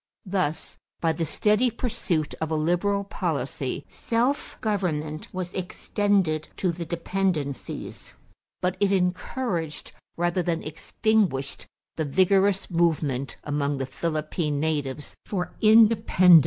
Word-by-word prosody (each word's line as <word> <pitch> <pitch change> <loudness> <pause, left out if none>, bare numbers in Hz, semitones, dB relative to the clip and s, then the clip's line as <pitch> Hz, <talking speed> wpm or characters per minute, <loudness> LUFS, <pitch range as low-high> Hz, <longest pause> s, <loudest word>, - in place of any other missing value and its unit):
Thus, 185 -5 -2 0.2
by 165 -1 +2
the 165 +1 -1
steady 210 - +3
pursuit 200 -9 -1
of 160 - -1
a 160 - 0
liberal 175 +6 +1
policy, 200 - -3
self 245 +5 -1
government 160 -9 -2
was 185 -1 -4
extended 185 -3 0
to 185 - +1
the 170 0 -5
dependencies; 170 -4 -3 0.5
but 180 0 +1
it 200 -1 +3
encouraged 180 - -1 0.3
rather 175 +1 +1
than 170 -1 -1
extinguished 160 -2 0 0.3
the 160 - 0
vigorous 190 +5 +3
movement 155 -6 +1
among 145 -1 -1
the 135 - -2
Philippine 155 +1 -2
natives 145 -2 -2
for 180 -4 -3
independence. 215 -5 +7
175 Hz, 115 wpm, -26 LUFS, 155-200 Hz, 0.5 s, independence